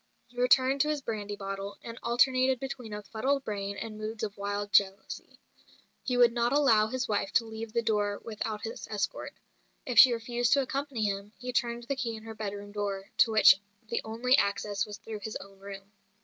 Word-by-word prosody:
He 245 +1 -6
returned 260 +2 +4
to 300 - +2
his 295 -2 -2
brandy 210 -3 -4
bottle, 195 0 -6
and 230 0 -8
alternated 255 +2 +3
between 260 -4 -6
a 210 0 -6
fuddled 265 +7 -1
brain 200 -2 -4
and 215 0 -6
moods 220 +1 -5
of 210 -1 -3
wild 205 0 -3
jealousy. 195 -1 +1 0.6
He 250 -2 -1
would 240 -1 +6
not 235 0 +1
allow 250 -7 +4
his 255 +2 -2
wife 205 -2 -1
to 230 - +3
leave 220 0 -7
the 235 +1 0
door 205 -2 0
without 215 -1 -4
his 225 - -6
escort; 205 -3 -3 0.5
if 245 -3 +3
she 260 - +10
refused 240 +1 0
to 280 - +4
accompany 275 -4 -3
him, 200 0 -2
he 250 0 -5
turned 235 -1 0
the 275 +4 -2
key 235 -4 -3
in 220 - -10
her 225 0 -7
bedroom 205 -2 -6
door, 200 -1 -4
to 230 - +5
which 215 -3 +7 0.3
the 235 - -1
only 235 +4 +2
access 200 0 -1
was 205 -1 -7
through 220 0 -7
his 215 +1 -6
own 195 0 -9
room. 195 0 -10
220 Hz, 200 wpm, -29 LUFS, 205-245 Hz, 0.6 s, she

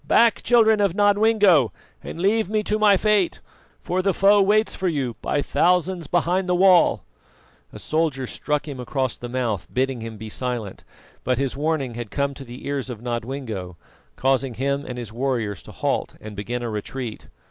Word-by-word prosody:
"Back! 230 -1 +4
children 220 -3 +4
of 195 -4 +1
Nodwengo, 205 - +4 0.3
and - - -7
leave 205 +2 +2
me 215 0 0
to 210 +1 -1
my 205 -2 +5
fate, 210 -3 +1 0.4
for 180 +2 0
the 195 0 +1
foe 200 +1 +5
waits 215 +3 +3
for 190 - -2
you 135 -8 -1
by 145 - 0
thousands 180 -2 +1
behind 180 +3 0
the 180 - +3
wall!" 185 -1 +5 0.7
A - - -10
soldier 155 -4 -1
struck 150 +4 -2
him 140 -3 -6
across 130 0 -2
the 120 - -8
mouth, 120 -6 -2
bidding 130 -1 -1
him 110 -1 -7
be 110 +2 -8
silent; 120 -3 -4 0.4
but 125 0 0
his 135 0 -1
warning 145 -3 -1
had 120 -2 -6
come 140 +4 -1
to 135 - -10
the 120 0 -10
ears 140 -2 -3
of 120 -4 -6
Nodwengo, 120 -6 -5 0.4
causing 130 -1 0
him 140 +3 -1
and 125 - -6
his 115 -3 -7
warriors 115 -7 -2
to - - -13
halt - - -2
and 105 -1 -9
begin 120 +4 -4
a 120 - -3
retreat. 110 +2 -6
140 Hz, 180 wpm, -23 LUFS, 120-185 Hz, 0.7 s, my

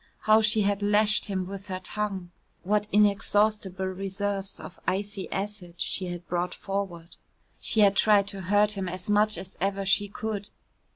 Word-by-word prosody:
How 215 +1 +5
she 215 0 +3
had 200 0 +1
lashed 210 +1 +3
him 190 -2 -2
with 195 +1 -7
her 185 -1 -3
tongue! 190 -2 -3 0.3
What 210 +2 +1
inexhaustible 205 -1 +2
reserves 195 +1 -3
of 180 - -10
icy 200 0 -2
acid 195 -3 -4
she 185 +1 -2
had 175 -1 -6
brought 180 +1 -1
forward. 190 -4 -5 0.4
She 220 - +2
had 200 -1 +5
tried 205 -2 +4
to 195 -2 -6
hurt 205 +3 +3
him 195 -3 -3
as 185 +3 -4
much 215 +1 +3
as 190 - -8
ever 195 0 0
she 205 +2 +3
could. 205 0 -5
200 Hz, 165 wpm, -27 LUFS, 190-210 Hz, 0.4 s, How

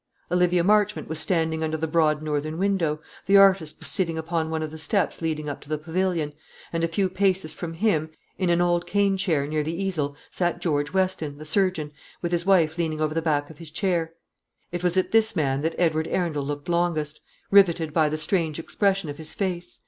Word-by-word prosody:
Olivia 180 -1 +3
Marchmont 210 +2 +2
was 160 0 -2
standing 160 -3 0
under 160 0 -1
the 160 - -1
broad 155 -1 +2
northern 155 +1 -2
window; 175 -6 0 0.3
the 200 +1 +6
artist 190 -6 +4
was - - -5
sitting 165 -4 0
upon 160 0 -2
one 160 0 -2
of 155 - -5
the 160 - -7
steps 155 - 0
leading 155 -2 -2
up 145 - -5
to 145 - -16
the 155 - 0
pavilion; 165 -1 -1 0.4
and 165 0 -1
a - - +3
few 190 +4 0
paces 185 -3 0
from 165 0 -6
him, 165 -5 +1 0.3
in 185 -2 -1
an 170 0 +3
old 175 0 +1
cane 200 -1 +2
chair 165 -7 +1
near 155 +1 -1
the 160 +4 -3
easel, 160 -8 -1 0.2
sat 175 -1 -1
George 150 -4 -1
Weston, 185 -6 -1
the 155 - -9
surgeon, 165 -3 +1 0.3
with 170 - -3
his 175 +1 0
wife 170 -4 +3
leaning 160 -2 -1
over 155 0 0
the 165 - 0
back 150 -2 0
of 160 - -16
his 165 -2 -7
chair. 165 -1 -1 0.6
It 175 0 -4
was 180 +1 +1
at 185 - +1
this 225 -1 +4
man 140 -4 0
that 160 +2 -1
Edward 160 -2 +1
Arundel 165 -6 -1
looked 145 0 -5
longest, 170 -4 0 0.3
riveted 170 -6 +4
by 155 -2 +3
the 155 - -2
strange 155 -1 0
expression 195 +1 0
of 145 +1 -7
his 155 -1 -6
face. 180 -3 -3
165 Hz, 210 wpm, -25 LUFS, 155-185 Hz, 0.6 s, the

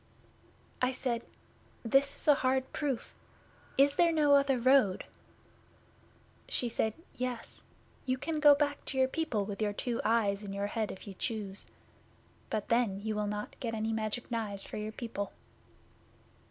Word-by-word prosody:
'I 255 +1 +2
said, 245 -2 -1 0.6
"This 275 +4 +3
is - - -9
a 295 - +9
hard 260 -1 0
proof. 280 -5 -2 0.6
Is 280 +1 +5
there 340 -1 +5
no 300 -3 +4
other 275 -2 +5
road?" 245 -6 +4 1.4
'She 245 - 0
said, 220 -1 0 0.2
"Yes. 250 -2 -3 0.5
You 255 0 +1
can 310 +4 -2
go 295 -1 +8
back 290 0 0
to 265 - -4
your 260 0 +5
people 260 -9 -1
with 200 +1 -5
your 205 -1 +1
two 235 +3 -2
eyes 210 -3 +2
in 195 -1 -5
your 200 0 -1
head 215 +1 -1
if 190 - -10
you 200 - -7
choose. 205 -1 -3 0.8
But 215 -2 -2
then 230 -5 +2
you 220 0 -1
will 210 0 -1
not 210 0 -4
get 230 -2 -2
any 220 +1 -1
Magic 220 +3 -3
Knives 210 -4 -3
for - - -6
your 215 0 -3
people." 220 -3 -5
235 Hz, 160 wpm, -32 LUFS, 210-270 Hz, 1.4 s, a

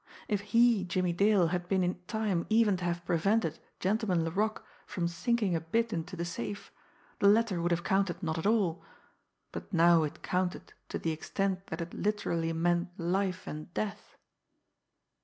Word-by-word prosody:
If 205 -2 0
he, 230 0 +4
Jimmie 180 -1 0
Dale, 195 -2 +4
had 175 0 -2
been 190 0 +2
in 180 0 -2
time 210 -6 -1
even 220 -2 +4
to 180 - -4
have 175 0 -2
prevented 175 0 +1 0.2
Gentleman 190 -4 +1
Laroque 210 +6 -1 0.2
from 170 -2 -2
sinking 205 +2 0
a 165 - -1
bit 225 +8 0
into 175 +2 -4
the 170 -1 -3
safe, 115 -12 -5 0.5
the 200 - +4
letter 210 -4 +3
would 170 - +1
have 170 0 0
counted 190 -1 0
not 160 -1 -1
at 160 - -1
all 200 -6 +1 0.7
but - - -7
now 170 -2 +5
it 150 -2 -4
counted 180 0 -2 0.2
to - - -2
the 165 - -1
extent 190 +4 -2
that - - -4
it 170 +1 -6
literally 170 -6 -1
meant 175 +2 +1
life 185 +2 -1
and 155 +3 -7
death. 210 -1 -4
180 Hz, 170 wpm, -30 LUFS, 170-205 Hz, 0.7 s, now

